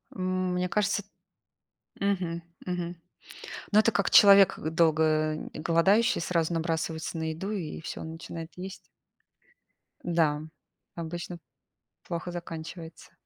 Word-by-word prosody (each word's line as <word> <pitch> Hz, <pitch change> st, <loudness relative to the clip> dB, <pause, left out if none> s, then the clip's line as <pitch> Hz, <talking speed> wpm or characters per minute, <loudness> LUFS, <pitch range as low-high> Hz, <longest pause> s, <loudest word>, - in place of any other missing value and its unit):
М, 185 Hz, -1 st, -1 dB
мне 180 Hz, 0 st, 0 dB
кажется, 210 Hz, -1 st, +1 dB, 1.0 s
мгм, 180 Hz, -4 st, -1 dB, 0.2 s
мгм. 175 Hz, -1 st, -3 dB, 0.7 s
Ну, 210 Hz, -, +6 dB
это 230 Hz, -, +4 dB
как 200 Hz, -2 st, +1 dB
человек, 200 Hz, -2 st, +8 dB
э, 155 Hz, -, -2 dB
долго, 160 Hz, -1 st, +3 dB, 0.5 s
э, -, -, -7 dB
голодающий, 185 Hz, +8 st, +3 dB
сразу 170 Hz, -1 st, 0 dB
набрасывается 165 Hz, 0 st, -2 dB
на 160 Hz, 0 st, -2 dB
еду 190 Hz, +6 st, -4 dB
и 180 Hz, -8 st, -4 dB
всё -, -, -6 dB
начинает 165 Hz, 0 st, -7 dB
есть. 190 Hz, +1 st, -6 dB, 1.3 s
Да, 160 Hz, -4 st, +2 dB, 0.5 s
обычно 170 Hz, +1 st, -5 dB, 0.7 s
плохо 170 Hz, +1 st, -5 dB
заканчивается. 165 Hz, -1 st, -8 dB
170 Hz, 115 wpm, -28 LUFS, 165-185 Hz, 1.3 s, человек